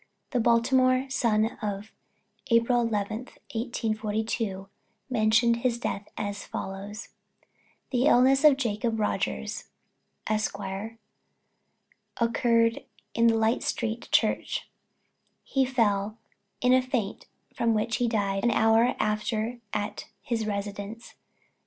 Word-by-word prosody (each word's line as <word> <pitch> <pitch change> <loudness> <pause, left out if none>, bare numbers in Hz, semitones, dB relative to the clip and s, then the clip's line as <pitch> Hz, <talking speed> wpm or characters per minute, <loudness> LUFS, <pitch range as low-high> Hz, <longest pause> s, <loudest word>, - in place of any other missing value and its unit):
The 250 - +1
Baltimore 255 +3 +3
Sun 225 -5 +2 0.2
of 205 0 -4 0.6
April 235 +1 +4
11, 215 -2 -1 0.4
1842, 220 -3 -2 0.4
mentioned 230 0 +3
his 235 0 0
death 205 -3 -4
as 205 -1 -3
follows: 200 +3 -6 0.8
"The 255 +1 +2
illness 270 +1 +5
of 295 -3 +7
Jacob 225 -2 -1
Rogers, 70 - -2 0.6
Esq., 215 -2 -1 1.6
occurred 230 0 +2 0.3
in 230 0 +4
Light 225 +1 +2
street 230 +1 -3
Church; - - +1 0.8
he 270 -1 +1
fell 215 -4 +1 0.4
in 250 +1 +4
a 255 - +5
faint 250 -6 -3 0.3
from 230 -1 +1
which 215 +1 0
he 245 - +1
died 200 -3 0
an 240 - +4
hour 225 +2 +4
after 215 +2 -1
at 205 0 -3 0.2
his 230 -5 -2
residence, 205 +2 -5
No. - - -38
225 Hz, 110 wpm, -27 LUFS, 210-240 Hz, 1.6 s, of